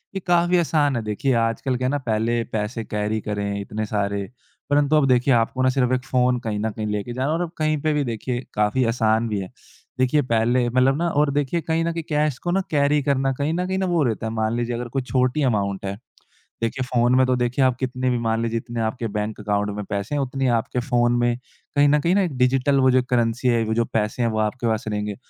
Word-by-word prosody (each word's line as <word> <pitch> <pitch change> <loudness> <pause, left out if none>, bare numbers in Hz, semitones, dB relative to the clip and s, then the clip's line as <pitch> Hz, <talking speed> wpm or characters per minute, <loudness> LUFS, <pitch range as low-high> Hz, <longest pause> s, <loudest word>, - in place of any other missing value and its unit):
ये - - -1
काफ़ी 175 +1 +3
आसान 150 -5 +2
है 115 - -1
देखिए, 110 +5 -1
आजकल 115 +3 0
क्या 130 0 -1
है - - +1
ना। 145 - +1
पहले 115 -1 0
पैसे 110 +2 -2
कैरी 105 +1 -2
करें 100 -1 -3
इतने 105 +2 -4
सारे। 100 -1 -2 0.4
परंतु 145 +1 +3
अब 145 -3 +4
देखिए 125 +1 +3
आपको 120 +3 +1
ना 130 - +4
सिर्फ़ 130 -1 +1
1 125 0 0
फ़ोन 125 -1 +2
कहीं 110 -3 -3
न 110 +1 -1
कहीं 105 0 -5
लेके 105 +3 -3
जाना 130 +2 -1
है - - +1
और - - -2
अब 165 - -6
कहीं 155 -1 +1
पे 155 -1 +1
भी 145 -1 +1
देखिए 120 +1 -3
काफ़ी 105 +5 +1
आसान 110 -1 +1
भी 105 -2 -1
है। 95 - -6 0.5
देखिए 130 +4 +3
पहले 120 +2 +2
मतलब 130 +2 +3
ना 170 +1 0
और 145 -2 +2
देखिए 145 +4 0
कहीं 165 +1 0
न 170 - 0
कहीं 165 -1 -4
कैश 150 -3 +1
को 175 - -2
ना 195 +1 +2
कैरी 145 0 +3
करना 135 -1 +1
कहीं 145 +4 -1
न 180 +1 -1
कहीं 190 0 -1
न - - 0
वो 160 -4 +3
रहता 110 -2 -1
है। - - -3
मान 110 +1 0
लीजिए 120 0 -2
अगर 120 0 -4
कोई - - +2
छोटी 130 +3 0
अमाउंट 100 -5 0
है। 100 +1 -4 0.6
देखिए 130 +3 -1
फ़ोन 125 0 +2
में 130 0 +5
तो 130 - +2
देखिए 125 +2 0
आप 130 -1 +2
कितने 130 0 -1
भी 125 - +1
मान 115 0 0
लीजिए 115 0 -1
जितने 120 0 -6
आपके 115 +1 -2
बैंक 105 +1 -3
अकाउंट 105 0 -1
में 105 - -4
पैसे 100 +8 -2
हैं 145 - +1
उतने 135 0 -1
आपके 125 - -4
फ़ोन 120 -1 +1
में 120 0 +1 0.4
कहीं 145 0 +5
न 150 +1 +4
कहीं 170 +4 +2
न - - +3
एक 180 -5 0
डिजिटल 135 +2 +2
वो 130 0 +5
जो 130 0 +4
करेंसी 120 0 +1
है 115 -2 +3
वो 110 - -1
जो 115 0 +1
पैसे 110 +2 -2
हैं 115 - +2
वो 110 0 -2
आपके 120 +2 -3
पास 110 +1 -1
रहेंगे। 105 -1 -2
125 Hz, 250 wpm, -22 LUFS, 110-135 Hz, 0.6 s, में